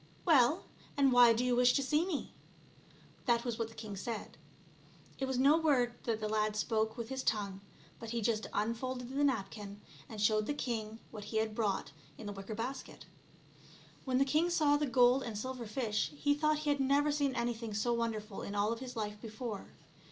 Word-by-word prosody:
" - - -28
Well, 305 0 +4 0.3
and 275 -2 +5
why 245 -1 +8
do 230 +2 +1
you 250 -1 +2
wish 245 0 +5
to 275 - +2
see 305 +6 +1
me 320 -7 -3 0.4
?" - - -26
That 235 0 +3
was 235 -2 -3
what 230 - 0
the 225 - -15
king 210 -3 -6
said. 220 +2 -5 0.8
It 270 - 0
was 265 -1 -2
no 285 +5 +5
word 260 -7 +2
that 225 -2 0
the 215 - -2
lad 215 0 0
spoke 220 +1 0
with 235 -1 -5
his 265 0 -3
tongue, 200 -4 -1 0.4
but 230 - -7
he 235 +1 -1
just 225 0 0
unfolded 245 +4 -2
the 290 - +2
napkin, 205 -6 -2 0.3
and 220 - -7
showed 215 0 +2
the 290 - -1
king 225 -5 -3
what 210 -2 -8
he 220 - -3
had 220 0 0
brought 210 -3 -1 0.3
in 225 - -9
the 205 - -4
wicker 195 +2 -6
basket. 255 +5 -6 1.0
When 255 -2 0
the 270 - +4
king 310 +5 +2
saw 305 -4 +3
the 295 0 0
gold 250 +1 +5
and 225 -5 -5
silver 255 +1 -5
fish, 215 -2 -1
he 290 0 +2
thought 305 +1 +2
he 300 -1 0
had 285 - 0
never 280 +2 +3
seen 285 -2 0
anything 235 -2 -2
so 240 +3 +1
wonderful 225 -3 -3
in 200 - -5
all 205 +2 +2
of 230 - -7
his 255 -1 -7
life 210 -2 -4
before. 220 -2 -6
235 Hz, 210 wpm, -33 LUFS, 215-265 Hz, 1.0 s, why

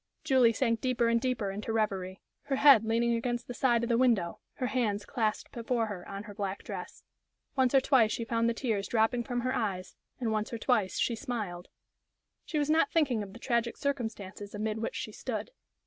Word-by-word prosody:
Julie 255 -4 +5
sank 230 -1 0
deeper 245 -2 +1
and 230 0 +2
deeper 245 -6 -1
into 210 +3 -4
reverie, 195 -4 -1 0.2
her 275 - 0
head 270 -5 +7
leaning 230 +1 +1
against 240 +1 -1
the 245 - -6
side 240 -2 +2
of - - 0
the 235 0 +3
window, 225 -10 +2
her 255 - -3
hands 215 -5 0
clasped 220 -3 -1
before 235 0 -1
her 200 -5 -7
on 200 +1 -5
her 210 -1 -10
black 200 -1 -4
dress. - - -7 0.5
Once 260 -1 +3
or 270 - +7
twice 240 -5 +4
she 230 - -2
found 230 0 +1
the 230 - -1
tears 220 -6 -1
dropping 235 +1 +2
from 245 +1 -2
her 255 +1 -1
eyes, 195 -5 -2 0.2
and 235 -3 -1
once 215 0 -1
or 230 - -3
twice 215 -5 +1
she 235 - +1
smiled. 215 -9 -4 0.8
She 315 - -3
was 290 -1 +1
not 315 -2 +4
thinking 270 -9 +2
of 195 -1 -7
the 235 - -11
tragic 235 -1 0
circumstances 215 -7 -4
amid 215 +1 -2
which 225 - -3
she - - -4
stood. - - -4
230 Hz, 205 wpm, -30 LUFS, 210-250 Hz, 0.8 s, head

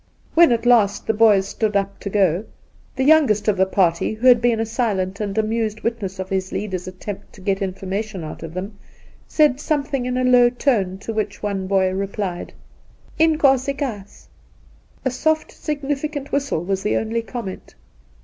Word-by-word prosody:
When 335 -4 +6
at 235 0 0
last 225 -5 +3
the 220 - +1
boys 210 -3 +4
stood 215 0 -2
up 200 0 -1
to 200 - -5
go, 190 -1 +1 0.5
the 260 - 0
youngest 270 -9 +4
of 210 - +3
the 190 0 +2
party, 185 +1 +1
who 225 +4 -5
had 245 -2 +7
been 235 -2 +2
a 225 - 0
silent 205 -5 -1
and 205 -1 -3
amused 220 0 -1
witness 215 -5 -3
of 190 0 -4
his 190 -1 -2
leader's 185 -3 -4
attempt 185 +2 -8
to - - -15
get 195 +1 -1
information 195 +1 -4
out 155 - -8
of 165 0 -8
them, 200 +3 -6 0.5
said 295 -4 +3
something 280 -4 -1
ia 250 0 -1
a - - +2
low 250 -1 +6
tone, 225 -7 0
to 210 +3 -6
which 210 -1 -3
one 195 -2 -2
boy 190 -1 +2
replied: 195 -2 -4 0.4
' - - -27
Inkosikaas.' 275 -8 +1 0.8
A 260 - +1
soft 315 +4 0
significant 290 0 -4
whistle 275 - -1
was 190 +1 -2
the 210 - 0
only 225 +1 -1
com 235 0 -6
ment. 190 - -9
215 Hz, 180 wpm, -21 LUFS, 195-250 Hz, 0.8 s, had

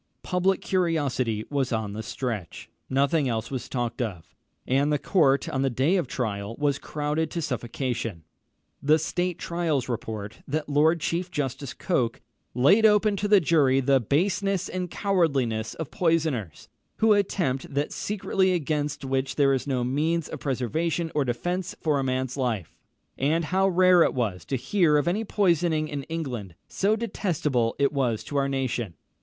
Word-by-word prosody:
Public 185 +1 +1
curiosity 145 - 0
was 135 -3 0
on 110 -3 -2
the 110 - -4
stretch. 110 -6 -5 0.2
Nothing 140 +1 +2
else 110 +1 -3
was 130 -2 -4
talked 120 -1 -2
of, 95 -9 -5 0.3
and 140 +3 +2
the 150 - +3
court 140 -5 +2
on 135 - -1
the 135 - +2
day 135 +9 +2
of 175 -8 0
trial 110 -4 -3
was 145 -2 +1
crowded 150 +1 -2
to 170 - -4
suffocation. 120 - -3 0.6
The 150 +3 +4
State 175 +3 -2
Trials 165 -6 -1
report, 110 -3 -5
that 150 +1 -2
Lord 155 +3 +3
Chief 175 +3 -1
Justice 140 -4 -3
Coke 125 -10 0 0.4
"laid 185 - +5
open 210 -1 +5
to 205 - -1
the 205 -1 +6
jury 145 -5 +3
the 135 0 +3
baseness 190 - 0
and 180 -1 -4
cowardliness 140 - 0
of 160 - -6
poisoners, 160 - 0 0.3
who 220 -1 +4
attempt 175 -11 0
that 140 +1 -1
secretly 190 -2 0
against 150 -3 -2
which 135 0 -1
there 140 -2 +4
is 135 +1 -2
no 130 -3 0
means 155 +6 0
of - - -6
preservation 155 +6 -1
or 150 - +2
defence 175 +9 -2
for 150 -3 +1
a - - 0
man's 130 -1 -1
life; 120 - -2 0.4
and 155 +5 +1
how 190 +4 +2
rare 185 -1 +5
it - - +3
was 100 -8 -2
to 135 - -2
hear 150 - +2
of 145 - 0
any 200 +6 +1
poisoning 170 -6 +1
in 145 -2 -4
England, 125 - -5
so 205 +3 +1
detestable 160 - -1
it 140 +1 +2
was 125 -6 0
to 145 - -8
our 140 0 +1
nation. 125 -8 -2
145 Hz, 165 wpm, -26 LUFS, 125-170 Hz, 0.6 s, the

